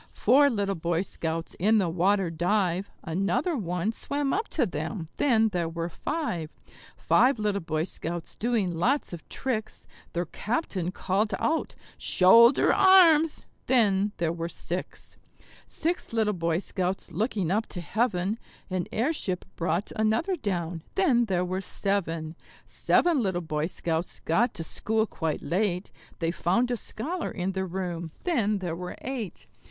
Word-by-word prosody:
Four 285 +3 +5
little 200 -5 0
Boy 170 0 -1
Scouts 165 -3 -4
in 215 +5 +4
the 195 -4 +2
water 185 +2 +2
dive; 180 +2 0
Another 200 - 0
one 180 -2 -1
swam 280 +4 -2
up 435 +3 -1
to - - +1
them 170 -8 -4
then 225 -6 +3
there 175 -4 -1
were 165 +1 -3
five. 175 - -3 0.5
Five 260 0 +4
little 210 -2 0
Boy 155 -1 -1
Scouts 170 -1 -5
doing 220 -6 0
lots 240 - 0
of 170 - -9
tricks; 225 -5 -3 0.3
Their 175 +1 -1
captain 200 - -2
called 195 +3 0
out, 320 +1 -1 0.2
"Shoulder 230 +8 +6
arms!" 335 -5 +6 0.2
then 205 -5 +3
there 165 -1 0
were 170 0 -4
six. 175 +1 -5 0.5
Six 340 -6 -3
little 220 -2 +2
Boy 165 -2 0
Scouts 185 0 -3
looking 195 -1 -1
up 215 +3 +1
to 180 - -6
heaven; 200 +3 0 0.3
An 185 -2 -1
airship 225 - -1
brought 170 +4 -1
another 220 - +1
down 175 - -3
then 270 -12 +3
there 180 -4 0
were 185 +1 -2
seven. 165 -5 -2 0.3
Seven 335 -6 +2
little 190 -5 0
Boy 155 -2 -2
Scouts 170 -1 -2
got 225 +10 +1
to 165 - -4
school 220 +6 0
quite 160 -7 -3
late; 180 0 -1 0.3
They 165 0 0
found 210 +9 +1
a 245 - 0
scholar 325 +12 -4
in 185 0 -2
the 190 0 -2
room 175 -2 -4
then 225 - +1
there 175 -4 -3
were 180 +1 -6
eight. 245 -8 -5
195 Hz, 145 wpm, -27 LUFS, 170-230 Hz, 0.5 s, Shoulder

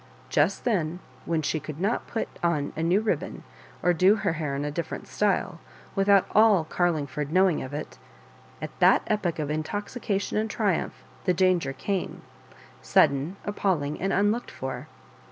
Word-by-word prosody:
Just 160 +7 +2
then, 175 -8 0 0.3
when 165 -2 0
she 155 - 0
could 155 0 -8
not 205 +6 0
put 225 - -2
on 155 -4 0
a 160 - -3
new 175 +5 +3
ribbon, 220 - -2 0.4
or 175 - +4
do 185 +5 +5
her 195 - 0
hair 155 -4 -3
in 140 +1 -2
a 150 - -2
different 170 +2 -4
style, 195 -3 0 0.3
without 195 0 +4
all 210 -5 +6
Carling 160 -2 0
ford 150 +1 -4
knowing 185 -2 +3
of 130 - -6
it 150 +1 -6 0.3
— - - -26
at - - -4
that - - +5
epoch 195 -6 -1
of 150 -2 -2
intoxication 200 +6 -2
and 220 +1 -1
triumph 205 -6 -1 0.2
the 180 -2 +2
danger 180 -5 +2
came, 185 +7 -3 0.6
sudden, 140 - +3
appalling, 180 -8 -1
and 195 +1 0
unlocked 210 +4 +1
for. 130 +1 -6
175 Hz, 165 wpm, -26 LUFS, 150-200 Hz, 0.6 s, all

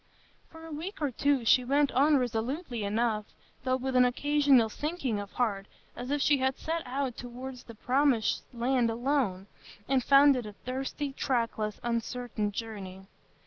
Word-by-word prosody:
For 325 0 -12
a 325 - -9
week 330 +7 -6
or 295 -3 0
two 275 0 +1
she 250 +3 +5
went 280 +2 +2
on 290 +3 +4
resolutely 245 - -2
enough, 215 +1 0 0.4
though 255 0 +1
with 260 0 -3
an 250 - +7
occasional 275 -1 +3
sinking 275 -3 -3
of 200 0 -8
heart, 200 -5 -1 0.3
as 245 +1 -6
if 290 0 +1
she 290 -2 +3
had 265 0 0
set 330 +1 -2
out 260 -1 -2
toward 250 +2 -7
the 230 -2 -12
Promised 255 -1 +1
Land 245 0 +1
alone, 230 -5 0 0.4
and 265 -2 +2
found 280 +1 +6
it 245 -4 -3
a 210 - -8
thirsty, 270 +4 -4
trackless, 230 -6 -1
uncertain 235 -2 -2
journey. 195 -4 -7
250 Hz, 160 wpm, -29 LUFS, 230-280 Hz, 0.4 s, an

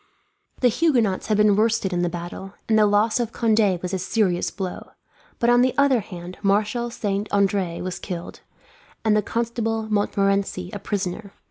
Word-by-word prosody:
The 250 - +5
Huguenots 240 - +1
had 215 - +2
been 210 -1 +5
worsted 215 -3 +1
in 175 - 0
the 175 - +1
battle, 175 +3 -7
and 220 -1 +3
the 210 - +5
loss 210 +3 +2
of 235 -2 -1
Conde 215 -5 +2
was 180 +1 -3
a 190 - 0
serious 185 -2 0
blow; 190 -3 -6 0.4
but 235 - 0
on 240 0 +5
the 255 0 +2
other 280 -3 +4
hand 180 -3 -9
Marshal 210 +4 +1
Saint 205 -3 -3
Andre 195 -3 +1
was 185 0 -4
killed, 175 -3 -6 0.7
and 215 -1 +4
the 210 - +3
Constable 225 0 -2
Montmorency 195 -3 0
a 205 - -4
prisoner. 200 0 -4
205 Hz, 170 wpm, -23 LUFS, 190-225 Hz, 0.7 s, The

